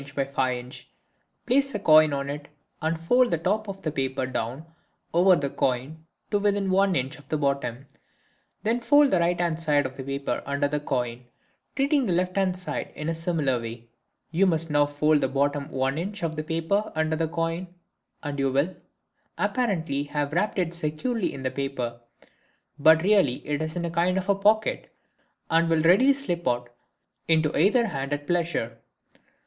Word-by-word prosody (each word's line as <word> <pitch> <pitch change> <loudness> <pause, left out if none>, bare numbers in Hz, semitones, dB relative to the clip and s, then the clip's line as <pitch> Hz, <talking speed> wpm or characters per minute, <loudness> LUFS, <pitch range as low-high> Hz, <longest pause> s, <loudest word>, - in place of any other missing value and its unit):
by 140 - 0
5 130 -2 -1
in., 125 +1 -9 0.7
place 275 +1 +1
a - - -1
coin 155 -4 +6
on 140 0 -2
it 145 +1 -6 0.3
and 160 +1 -1
fold 245 +9 +3
the 170 - +1
top 205 +6 -1
of 195 0 -7
the 155 - -1
paper 130 -2 -2
down 130 +3 -4 0.5
over 180 +2 +6
the 145 -4 -1
coin 135 +5 -2 0.2
to 205 - +2
within 200 -1 +1
1 195 0 +3
in. 130 - +1
of 145 - -18
the 155 - 0
bottom. 140 -3 -1 0.8
Then 225 +3 +1
fold 290 +3 +5
the 185 - +3
right 170 +1 +1
hand 170 -2 0
side 150 -3 +2
of 130 - -6
the 135 - -5
paper 140 +1 -3
under 140 +1 0
the 150 +1 -1
coin, 125 -4 -3 0.5
treating 275 -1 +2
the 180 - +1
left 180 +1 0
hand 190 -2 +1
side 180 - -5
in 155 +1 -4
a - - 0
similar 160 -7 -1
way. 115 0 -8 0.4
You 185 +4 +3
must 165 -2 0
now 145 0 +3
fold 145 +1 +2
the - - +2
bottom 140 +2 -1
1 135 0 -1
in. 195 +5 -4
of 160 -1 -2
the 155 - -3
paper 165 +7 -1
under 160 0 +1
the 165 0 0
coin 165 +2 -2 0.6
and 145 -2 -4
you 135 -1 +1
will, 145 +8 0 0.6
apparently, 165 - -1
have 145 0 -3
wrapped 200 +6 0
it 175 -2 0
securely 175 +8 -2
in 135 - -8
the 130 - -1
paper; 130 -3 -4 0.8
but 160 +2 +6
really 195 -11 +2
it 150 0 -1
is 155 0 -4
in 175 -1 -2
a 170 - -3
kind 175 +2 +1
of 195 +1 0
pocket, 215 +2 +2 0.6
and 165 +1 +3
will 160 -1 +2
readily 200 +12 +6
slip 175 - -3
out 120 0 -1 0.6
into 160 -2 +2
either 235 +4 +4
hand 140 -8 -4
at 145 0 -4
pleasure. 165 -9 -1
160 Hz, 185 wpm, -26 LUFS, 140-185 Hz, 0.8 s, coin